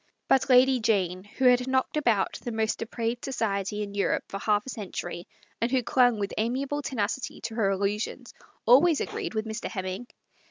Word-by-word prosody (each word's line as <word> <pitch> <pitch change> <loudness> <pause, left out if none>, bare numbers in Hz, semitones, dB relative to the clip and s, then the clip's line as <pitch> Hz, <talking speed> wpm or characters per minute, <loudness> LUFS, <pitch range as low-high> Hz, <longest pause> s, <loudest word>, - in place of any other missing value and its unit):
But 270 0 +3
Lady 255 0 +6
Jane, 185 -5 0
who 260 +5 -3
had 250 0 +5
knocked 260 +2 0
about 235 -10 +1
the 240 - -3
most 220 -1 -1
depraved 230 +1 -3
society 210 -5 -2
in 200 -1 -7
Europe 200 -1 0
for 195 - -5
half 210 0 +1
a - - -7
cen 210 -6 -7
tury, 175 0 -5 0.4
and 230 - +2
who 255 -1 +1
clung 245 -1 +3
with 200 -1 -3
amiable 270 +6 -1
tenacity 245 -2 -3
to 225 - -5
her 220 -3 +1
illusions, 205 +5 -2 0.3
always 290 +7 +6
agreed - - -4
with 215 0 -1
Mr. 220 +1 -4
Hem 190 -3 -4
ming. 190 +6 -5
225 Hz, 190 wpm, -27 LUFS, 205-250 Hz, 0.4 s, Lady